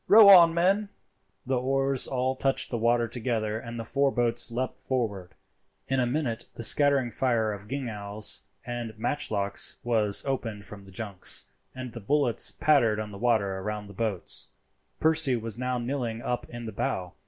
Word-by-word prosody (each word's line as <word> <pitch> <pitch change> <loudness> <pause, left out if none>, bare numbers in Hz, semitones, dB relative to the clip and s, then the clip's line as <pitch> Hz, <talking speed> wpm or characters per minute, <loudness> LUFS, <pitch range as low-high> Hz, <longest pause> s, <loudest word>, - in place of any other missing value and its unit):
Row 210 -1 +9
on, 175 -4 +9
men." 195 +5 +1 0.6
The 130 -1 0
oars 135 +1 +2
all 130 0 -1
touched 135 +1 -1
the 120 - -1
water 120 +1 +2
together, 110 -2 -2
and 115 0 -8
the - - -3
four 140 +4 +1
boats 120 -2 +2
leapt 125 +2 -3
forward. 105 -8 -3 0.5
In 135 0 0
a 125 - +1
minute 120 -4 -2
a 115 - -6
scattering 140 -1 +3
fire 115 -2 0
of 100 0 -10
gingals 110 -5 -2 0.2
and 120 -2 -5
matchlocks 105 -5 +1
was 110 -4 +2
opened 115 -7 -3
from 100 -1 -10
the 95 - -14
junks, 100 -2 -3 0.3
and 130 -2 -7
the 120 - -6
bullets 125 +2 +1
pattered 120 -8 +2
on 105 -1 -5
the 100 - -9
water 100 -5 +1
round 105 +1 -4
the 100 - -12
boats. 105 -2 -1 0.5
Percy 155 -4 +3
was 115 0 -3
now 125 0 -1
kneeling 120 -2 -3
up 125 - -3
in 120 0 -8
the 110 - -5
bow. 90 -2 -3
120 Hz, 170 wpm, -27 LUFS, 110-135 Hz, 0.6 s, Row